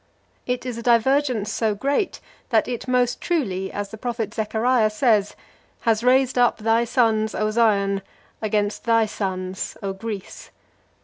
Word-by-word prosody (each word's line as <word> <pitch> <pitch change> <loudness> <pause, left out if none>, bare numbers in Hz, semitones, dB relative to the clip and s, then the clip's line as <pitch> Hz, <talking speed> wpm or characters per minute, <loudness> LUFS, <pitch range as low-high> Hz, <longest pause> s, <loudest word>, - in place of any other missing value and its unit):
It 250 0 -2
is 245 -2 -4
a - - -5
divergence 240 -2 +2
so 220 -2 0
great 280 - -1 0.3
that 225 -4 +2
it 245 0 -4
most 250 -1 +1
truly, 195 - -1
as 205 0 -4
the 220 - -10
prophet 230 -3 -3
Zechariah 220 +1 +1
says, 215 -3 +2 0.5
"has 225 -1 +1
raised 255 0 +3
up 245 -1 +3
thy 225 +2 +2
sons, 220 -3 +1
O 215 0 0
Zion, 200 -3 +2 0.4
against 210 -1 -1
thy 230 -1 +4
sons, 190 -3 -4
O 195 -1 -2
Greece!" 205 -1 -7
225 Hz, 145 wpm, -23 LUFS, 210-245 Hz, 0.5 s, thy